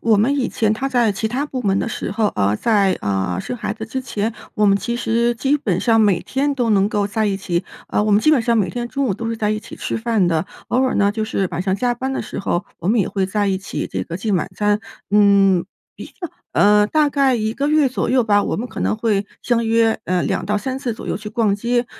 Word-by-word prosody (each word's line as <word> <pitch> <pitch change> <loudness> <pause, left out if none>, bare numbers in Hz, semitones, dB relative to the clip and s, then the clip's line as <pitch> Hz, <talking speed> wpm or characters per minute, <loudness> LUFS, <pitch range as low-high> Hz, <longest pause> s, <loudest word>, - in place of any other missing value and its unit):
我 225 -2 +3
们 235 +8 +2
以 260 - 0
前 215 -2 +1
她 260 +5 -2
在 240 -5 +2
其 205 +3 -2
他 270 +6 -2
部 255 -3 -5
门 195 -1 +1
的 - - -1
时 - - -4
候 210 +2 +1
呃， 100 +1 +1
在， 200 - +2
呃， 95 -3 -1
生 250 - -5
孩 215 -3 -3
子 220 - -7
之 260 +4 -3
前， 230 -3 -3 0.2
我 210 - +2
们 200 0 +5
其 235 +3 -3
实 235 0 +1
基 280 +5 +2
本 190 -10 -1
上 225 -2 +3
每 200 -5 +3
天 280 +2 -1
都 245 -4 -1
能 200 -1 +3
够 205 -1 0
在 215 +1 -1
一 195 -1 0
起 185 -1 -2 0.2
呃， - - 0
我 215 - 0
们 205 +1 +5
基 310 - +4
本 255 -6 +3
上 230 -1 +2
每 200 - +1
天 240 -1 -4
中 275 +2 -1
午 195 - 0
都 230 +2 -4
是 230 - -2
在 210 -1 0
一 215 0 -1
起 215 - -11
吃 - - -3
饭 225 -5 +1
的。 165 -1 +1 0.2
偶 255 +2 +2
尔 260 - +1
呢 200 0 +3
就 220 0 -2
是 195 -3 -1
晚 180 - -2
上 190 0 0
加 245 +2 0
班 265 +2 -3
的 - - -2
时 - - -6
候， 190 0 -1
我 170 - -3
们 230 +2 +3
也 195 - +1
会 195 -2 -1
在 205 +2 0
一 190 -1 +1
起 195 - -4
这 - - -4
个 170 - -6
进 200 +1 -1
晚 175 - -1
餐。 210 0 +1 0.3
嗯， 200 -3 +4 0.3
一 - - -9
个 350 - -8 0.2
呃， 210 0 +5
大 305 +1 +3
概 270 -3 +2
1 220 0 -1
个 285 +4 -1
月 305 -2 +4
左 255 - -2
右 250 -2 +3
吧， 205 -2 +3
我 - - -2
们 235 - -3
可 - - -7
能 - - 0
会 210 -3 0 0.2
相 235 -1 +1
约， 225 0 +2
呃， 180 0 0
2-3 210 +7 -1
次 255 -4 -3
左 - - -9
右 - - -1
去 210 0 -7
逛 210 -2 +1
街。 240 +3 0
215 Hz, 280 characters per minute, -20 LUFS, 200-240 Hz, 0.3 s, 们